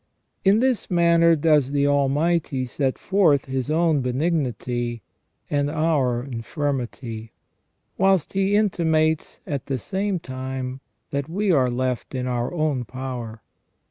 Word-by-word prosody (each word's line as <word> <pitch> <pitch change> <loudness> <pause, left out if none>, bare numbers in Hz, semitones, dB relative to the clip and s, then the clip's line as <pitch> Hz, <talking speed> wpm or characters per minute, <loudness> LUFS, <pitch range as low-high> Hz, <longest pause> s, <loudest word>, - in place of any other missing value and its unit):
In 200 +3 +4
this 255 -3 +1
manner 170 -2 +4
does 150 -3 +2
the 140 0 +2
Almighty 145 0 +1
set 130 +1 -1
forth 180 -8 +3
His 130 0 -3
own 160 -2 +2
benignity 125 - -1 0.4
and 145 0 0
our 145 -6 +1
infirmity, 120 -3 -4 0.7
whilst 190 -3 +3
He 195 +1 +2
intimates 160 -6 +1
at 140 -3 -4
the 135 -2 -1
same 195 - -2
time 130 -2 -5 0.3
that 140 +1 -2
we 200 +3 +1
are 130 -6 +3
left 125 +1 -2
in 125 -1 -2
our 120 -1 -1
own 155 -7 0
power. 120 -3 -6
140 Hz, 125 wpm, -23 LUFS, 130-165 Hz, 0.7 s, In